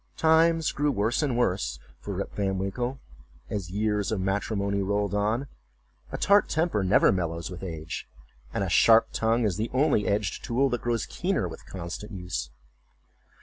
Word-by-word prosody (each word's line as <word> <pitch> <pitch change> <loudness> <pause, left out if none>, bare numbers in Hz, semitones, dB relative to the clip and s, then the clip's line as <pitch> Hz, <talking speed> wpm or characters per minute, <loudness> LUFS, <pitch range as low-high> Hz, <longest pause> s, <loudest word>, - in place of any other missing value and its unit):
Times 160 0 +4
grew 145 0 0
worse 110 +3 0
and 135 -6 0
worse 95 -6 0 0.3
with - - -4
Rip - - -4
Van 95 -1 -1
Winkle 120 +7 -3 0.5
as 100 -4 -3
years 105 +2 0
of 110 - 0
matrimony 100 +1 -1
rolled 100 +1 0
on; 105 +6 0 0.7
a - - -3
tart 200 0 +4
temper 160 - +1
never 95 +2 +5
mellows 85 -2 -2
with 90 - -8
age, 80 -3 -6 0.4
and - - -1
a - - -1
sharp 115 +5 +6
tongue 115 +1 +1
is 95 -5 0
the 110 +2 -2
only 135 -6 +3
edged 100 -2 -1
tool 130 +3 +1
that 120 -2 -2
grows 120 -2 -1
keener - - -1
with - - -10
constant 95 +4 -7
use. 90 -10 -4
105 Hz, 165 wpm, -27 LUFS, 95-120 Hz, 0.7 s, sharp